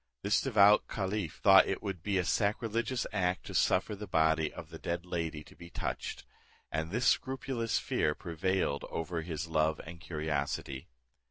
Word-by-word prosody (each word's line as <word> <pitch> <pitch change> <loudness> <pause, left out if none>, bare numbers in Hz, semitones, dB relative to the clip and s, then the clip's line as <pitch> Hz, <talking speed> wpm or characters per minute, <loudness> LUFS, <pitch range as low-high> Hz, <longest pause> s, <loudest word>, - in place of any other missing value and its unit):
This 100 +1 +3
devout 105 -5 +5
caliph 95 -4 -3
thought - - +8
it - - -2
would 95 -4 -4
be 100 +2 0
a 90 - +1
sacrilegious 115 +5 0
act 90 0 0
to - - -7
suffer 105 - +2
the 105 +1 -7
body 80 -1 +2
of 80 - -9
the 80 -1 -9
dead 85 +1 -3
lady 80 -4 -3
to - - -17
be 85 - -12
touched; - - -4 0.5
and 80 +1 -2
this 120 +7 -1
scrupulous 130 -3 +1
fear 75 - 0
prevailed 85 -3 -1
over 80 0 -3
his 80 -1 -4
love 80 -1 +1
and 85 +1 -10
curiosity. 75 -4 -3
85 Hz, 165 wpm, -32 LUFS, 80-105 Hz, 0.5 s, thought